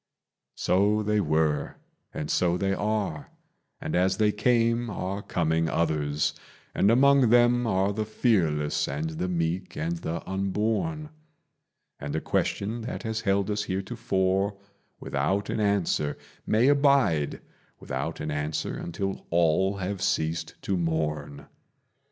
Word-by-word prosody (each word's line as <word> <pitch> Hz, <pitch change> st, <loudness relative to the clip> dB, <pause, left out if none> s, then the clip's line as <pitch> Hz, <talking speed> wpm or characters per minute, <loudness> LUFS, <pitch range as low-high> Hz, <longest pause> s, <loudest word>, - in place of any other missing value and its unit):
So 105 Hz, +3 st, +2 dB
they 105 Hz, 0 st, +1 dB
were, 80 Hz, -2 st, 0 dB, 0.4 s
and 75 Hz, 0 st, -4 dB
so 90 Hz, -1 st, +2 dB
they 95 Hz, +1 st, 0 dB
are; 100 Hz, -7 st, -2 dB, 0.5 s
and -, -, -3 dB
as 95 Hz, +1 st, +2 dB
they 105 Hz, -1 st, +3 dB
came 115 Hz, +2 st, +2 dB
are 100 Hz, 0 st, -3 dB
coming 80 Hz, -3 st, 0 dB
others, 75 Hz, -3 st, 0 dB, 0.4 s
And 100 Hz, -, +3 dB
among 135 Hz, +1 st, +5 dB
them 120 Hz, 0 st, +4 dB
are 95 Hz, -1 st, +1 dB
the 110 Hz, +1 st, -1 dB
fearless 90 Hz, -, +1 dB
and 75 Hz, +3 st, -3 dB
the 80 Hz, +3 st, -3 dB
meek 90 Hz, +1 st, -2 dB
and 165 Hz, +2 st, -2 dB
the 85 Hz, -, -5 dB
unborn; 110 Hz, -, -1 dB, 0.9 s
And 70 Hz, +1 st, -4 dB
a -, -, +1 dB
question 110 Hz, +7 st, -1 dB
that 115 Hz, -, -5 dB
has 110 Hz, -1 st, -2 dB
held 100 Hz, 0 st, +1 dB
us 105 Hz, 0 st, -1 dB
heretofore 95 Hz, -1 st, -1 dB, 0.4 s
without 85 Hz, +9 st, -1 dB
an -, -, -2 dB
answer 100 Hz, -8 st, +1 dB, 0.3 s
May 115 Hz, +4 st, +3 dB
abide 140 Hz, -, +3 dB, 0.4 s
without -, -, -4 dB
an 75 Hz, -, -3 dB
answer 75 Hz, +1 st, -2 dB
until 95 Hz, +3 st, -4 dB
all 85 Hz, +4 st, +2 dB
have 95 Hz, 0 st, -3 dB
ceased 80 Hz, +1 st, -1 dB
to 95 Hz, -, 0 dB
mourn. 75 Hz, -4 st, -2 dB
95 Hz, 130 wpm, -27 LUFS, 80-110 Hz, 0.9 s, among